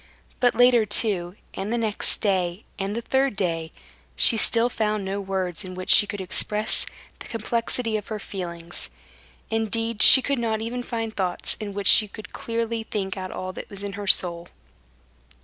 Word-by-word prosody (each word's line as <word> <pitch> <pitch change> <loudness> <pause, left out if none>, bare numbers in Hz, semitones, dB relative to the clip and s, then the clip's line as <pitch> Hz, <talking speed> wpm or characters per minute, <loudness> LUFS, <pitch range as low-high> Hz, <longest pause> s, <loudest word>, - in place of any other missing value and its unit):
But 245 -1 +2
later 245 -2 +5
too, 195 -4 0 0.2
and 200 +3 -4
the 240 - 0
next 220 -3 0
day 185 -1 -1 0.2
and 195 +2 -3
the 235 - -4
third 265 -2 +1
day, 165 -4 -2 0.4
she 235 - +7
still 230 +2 +4
found 215 -4 -2
no 195 +1 -3
words 190 -2 -3
in 185 -1 -8
which 185 0 -2
she 205 - +6
could 205 - -5
express 210 +3 +2 0.3
the - - -10
complexity 230 0 -2
of 210 - -8
her 220 - -4
feelings; 175 -4 -7 0.6
indeed, 225 0 -2
she 265 +3 +9
could 280 -1 -1
not 220 -2 -1
even 235 +3 -4
find 225 -2 -5
thoughts 185 -3 -2
in 205 -2 -6
which 200 -1 -4
she 215 - +6
could 215 +1 -12
clearly 230 0 -3
think 200 -4 -4
out 185 -1 -6
all 185 0 -6
that - - -9
was 200 0 -8
in 200 -1 -5
her 205 0 -6
soul. 170 -2 +5
210 Hz, 180 wpm, -24 LUFS, 190-230 Hz, 0.6 s, she